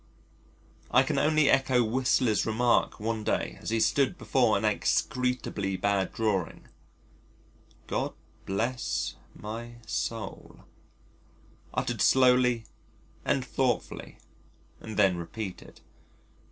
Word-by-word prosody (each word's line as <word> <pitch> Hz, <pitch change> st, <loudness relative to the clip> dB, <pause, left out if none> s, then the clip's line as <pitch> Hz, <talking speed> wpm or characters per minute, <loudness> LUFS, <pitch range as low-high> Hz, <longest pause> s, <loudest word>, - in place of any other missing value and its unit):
I -, -, +5 dB
can -, -, 0 dB
only 155 Hz, -1 st, +3 dB
echo 130 Hz, -3 st, +4 dB
Whistler's 120 Hz, -1 st, +2 dB
remark 115 Hz, +2 st, +1 dB
one 110 Hz, 0 st, -2 dB
day -, -, -1 dB
as -, -, -4 dB
he 115 Hz, 0 st, +1 dB
stood 140 Hz, +9 st, +2 dB
before 120 Hz, -9 st, +2 dB
an 105 Hz, -, -2 dB
execrably 110 Hz, -3 st, 0 dB
bad 100 Hz, -1 st, 0 dB
drawing 100 Hz, -7 st, -2 dB, 1.2 s
"God -, -, -2 dB, 0.3 s
bless 115 Hz, +6 st, -1 dB, 0.2 s
my 115 Hz, +3 st, -7 dB
soul" 110 Hz, -4 st, -5 dB, 1.1 s
uttered -, -, -2 dB
slowly 125 Hz, -3 st, +4 dB, 0.6 s
and 130 Hz, -2 st, 0 dB
thoughtfully 125 Hz, -2 st, -2 dB, 0.6 s
and 110 Hz, -, -8 dB
then 95 Hz, -4 st, +4 dB
repeated. 90 Hz, +3 st, -7 dB
115 Hz, 100 wpm, -28 LUFS, 105-125 Hz, 1.2 s, I